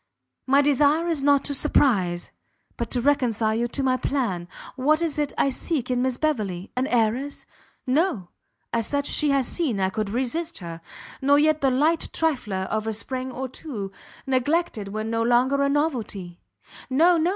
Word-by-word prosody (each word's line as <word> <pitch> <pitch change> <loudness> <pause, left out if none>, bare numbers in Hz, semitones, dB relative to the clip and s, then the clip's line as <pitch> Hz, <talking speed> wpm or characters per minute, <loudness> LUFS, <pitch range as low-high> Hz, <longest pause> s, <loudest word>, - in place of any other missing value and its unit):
My 275 +2 +5
desire 295 +4 +3
is 320 -4 0
not 280 0 +3
to 285 - -2
surprize, 200 -12 +1 0.4
but 235 -2 -3
to 245 - 0
reconcile 235 -5 +2
you 235 +2 0
to 275 +3 -3
my 255 -1 +2
plan. 230 -11 -2 0.3
What 300 +4 +2
is 310 -2 -1
it 295 -1 0
I 275 - +3
seek 265 -1 -2
in 245 0 +1
Miss 255 -1 0
Beverley? 210 - -2
An 255 +2 0
Heiress? 245 +4 0 0.4
No, 255 - 0 0.4
as 230 -2 +1
such 285 -1 -1
she 300 0 +2
has 275 -3 +2
seen 280 - -1
I 190 0 +1
could 215 0 -2
resist 290 +9 -2
her; 170 -2 -8 0.4
nor 285 +2 +5
yet 310 +1 +3
the 270 - +4
light 305 +6 +2
trifler 235 -12 0
of 220 0 -1
a 220 - -1
spring 255 +4 -4
or 260 +1 -4
two, 235 -7 -6 0.3
neglected 265 - 0
when 215 +2 -4
no 230 0 0
longer 250 +4 +3
a 280 - +2
novelty; 230 - -2 0.5
no, 335 +7 +4
no! 325 +2 +2
260 Hz, 175 wpm, -24 LUFS, 220-290 Hz, 0.5 s, My